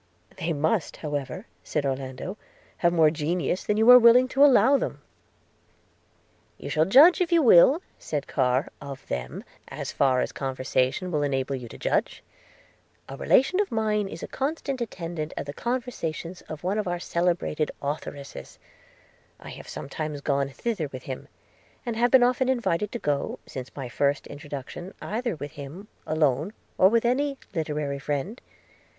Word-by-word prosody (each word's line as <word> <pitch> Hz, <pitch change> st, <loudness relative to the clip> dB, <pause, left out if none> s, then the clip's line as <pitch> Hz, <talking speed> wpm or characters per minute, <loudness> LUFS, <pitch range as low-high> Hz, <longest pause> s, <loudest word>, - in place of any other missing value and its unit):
'They 170 Hz, -, -2 dB
must, 160 Hz, +4 st, 0 dB
however,' 145 Hz, -, -4 dB, 0.2 s
said 150 Hz, -2 st, -2 dB
Orlando, 135 Hz, +7 st, -4 dB, 0.4 s
'have 170 Hz, -, +3 dB
more 160 Hz, -3 st, +4 dB
genius 170 Hz, +4 st, -1 dB
than 210 Hz, -, 0 dB
you 220 Hz, +1 st, +3 dB
are 250 Hz, -, +11 dB
willing 245 Hz, +2 st, +7 dB
to 270 Hz, +2 st, +4 dB
allow 280 Hz, 0 st, +6 dB
them.' -, -, -2 dB, 1.5 s
'You -, -, -7 dB
shall 155 Hz, 0 st, +3 dB
judge, 295 Hz, -, +7 dB
if 355 Hz, -1 st, +1 dB
you 335 Hz, -2 st, +5 dB
will,' 260 Hz, -, +7 dB, 0.2 s
said 150 Hz, -2 st, -3 dB
Carr, 130 Hz, +1 st, +1 dB
'of 140 Hz, -2 st, -8 dB
them, 65 Hz, 0 st, -4 dB, 0.2 s
as -, -, -5 dB
far 130 Hz, -2 st, +2 dB
as -, -, -2 dB
conversation 130 Hz, +5 st, -1 dB
will 150 Hz, -3 st, 0 dB
enable 135 Hz, -2 st, -1 dB
you 125 Hz, -2 st, -7 dB
to -, -, -11 dB
judge. -, -, -1 dB, 0.4 s
– -, -, -30 dB
A 135 Hz, -, -6 dB
relation 270 Hz, -, +3 dB
of 410 Hz, -, 0 dB
mine 215 Hz, -2 st, 0 dB
is 165 Hz, -3 st, -8 dB
a -, -, -4 dB
constant 275 Hz, -2 st, -3 dB
attendant 170 Hz, -8 st, -5 dB
at -, -, -3 dB
the 145 Hz, -, -6 dB
conversations 190 Hz, -, -4 dB
of 155 Hz, 0 st, -7 dB
one 195 Hz, +4 st, 0 dB
of 210 Hz, -, -2 dB
our 175 Hz, 0 st, -2 dB
celebrated 170 Hz, -3 st, 0 dB
authoresses 140 Hz, -1 st, -6 dB, 0.4 s
– -, -, -31 dB, 0.3 s
I -, -, -10 dB
have -, -, -10 dB
sometimes 150 Hz, +1 st, -5 dB
gone 140 Hz, -1 st, 0 dB
thither 190 Hz, -, -3 dB
with 130 Hz, -1 st, -8 dB
him, 130 Hz, -1 st, -7 dB, 0.6 s
and 235 Hz, -2 st, -2 dB
have 240 Hz, +2 st, +3 dB
been 260 Hz, -1 st, +6 dB
often 255 Hz, +1 st, +2 dB
invited 210 Hz, -6 st, 0 dB
to -, -, -1 dB
go, 145 Hz, -9 st, -2 dB
since 130 Hz, -1 st, -7 dB
my 135 Hz, -3 st, -5 dB
first 140 Hz, +4 st, 0 dB
introduction, 145 Hz, +5 st, -8 dB
either 230 Hz, -1 st, -3 dB
with 145 Hz, -1 st, -7 dB
him, 150 Hz, +9 st, -9 dB, 0.2 s
alone, 155 Hz, +3 st, +1 dB, 0.3 s
or 190 Hz, -, +7 dB
with 230 Hz, +2 st, +2 dB
any 275 Hz, +3 st, +1 dB, 0.2 s
literary 150 Hz, -4 st, -2 dB
friend. 145 Hz, -, -3 dB
165 Hz, 165 wpm, -26 LUFS, 140-230 Hz, 1.5 s, are